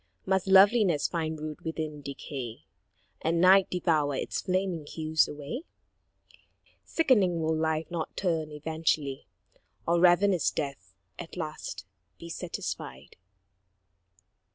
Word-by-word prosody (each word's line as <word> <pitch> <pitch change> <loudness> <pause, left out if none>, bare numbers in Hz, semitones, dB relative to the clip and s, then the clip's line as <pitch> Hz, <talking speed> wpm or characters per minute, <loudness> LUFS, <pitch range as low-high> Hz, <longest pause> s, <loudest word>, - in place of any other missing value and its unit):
Must 190 0 +1
loveliness 190 -4 +5
find 160 -2 -3
root 155 +2 -6
within 155 -2 -4
decay, 135 -4 -7 0.6
And 165 +1 +1
night 185 +2 +6
devour 155 -5 +1
its - - -2
flaming 185 -5 -1
hues 155 0 +1
alway? 150 - -5 1.2
Sickening, 210 - +2
will 160 0 +1
Life 160 0 -1
not 170 -2 -4
turn 165 -5 0
eventually, 150 -4 -2 0.6
Or 170 0 +3
ravenous 180 +1 +4
Death 135 - -5 0.2
at 175 +1 -8
last 155 - -5 0.3
be 170 - -10
satisfied? 165 - -6
160 Hz, 105 wpm, -28 LUFS, 150-180 Hz, 1.2 s, night